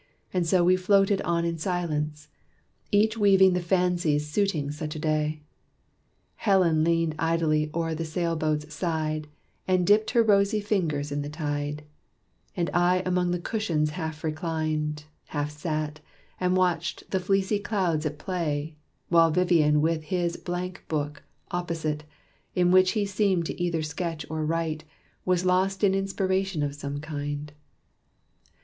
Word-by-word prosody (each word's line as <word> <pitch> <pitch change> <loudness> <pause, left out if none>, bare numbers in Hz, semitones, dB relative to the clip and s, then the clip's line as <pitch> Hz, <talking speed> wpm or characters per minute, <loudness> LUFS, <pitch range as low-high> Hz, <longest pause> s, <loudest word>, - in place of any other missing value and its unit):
And 180 -2 +1
so 180 +1 +4
we 180 +1 +5
floated 195 +1 +3
on 170 0 0
in 165 -1 -2
silence, 155 -4 -2 0.6
each 220 +2 +3
Weaving 195 -2 +6
the 180 - 0
fancies 175 -4 +1
suiting 155 -4 0
such 150 +1 -5
a - - -4
day. 155 0 -1 0.9
Helen 180 -7 +3
leaned 165 -1 +2
idly 160 -2 +1
o'er 165 0 -1
the 160 +1 -3
sail 165 +1 -1
boat's 155 -1 -1
side, 155 -3 -2 0.4
And 185 -1 +2
dipped 215 +3 +4
her 235 -2 +4
rosy 205 0 +3
fingers 165 -9 -1
in 145 0 -1
the 145 - -5
tide; 150 -1 -3 0.7
And 170 -1 0
I 180 +1 +3
among 180 -1 +1
the 175 - 0
cushions 170 -6 -1
half 160 -1 -5
reclined, 155 -2 -2 0.2
Half 145 -1 -3
sat, 155 0 -3 0.4
and 180 0 +2
watched 175 -2 -1
the 190 - +1
fleecy 195 +2 +1
clouds 185 -7 0
at 150 -1 -3
play 155 -3 -2 0.3
While 165 -1 +5
Vivian 160 -3 +3
with 160 0 0
his 170 +1 -1
blank 180 +1 -5
book, 150 -2 -3 0.3
opposite, 160 -4 -2 0.5
In 180 -1 +3
which 185 0 +5
he 210 -3 +1
seemed 195 -3 +1
to 175 - -5
either 170 -2 0
sketch 160 +1 -4
or 155 0 -2
write 160 -1 -1 0.4
Was 185 -1 +1
lost 190 +2 +1
in 195 -2 +5
inspiration 195 -3 0
of 145 -1 -2
some 145 0 -5
kind. 145 -1 -4
165 Hz, 145 wpm, -26 LUFS, 155-185 Hz, 0.9 s, Weaving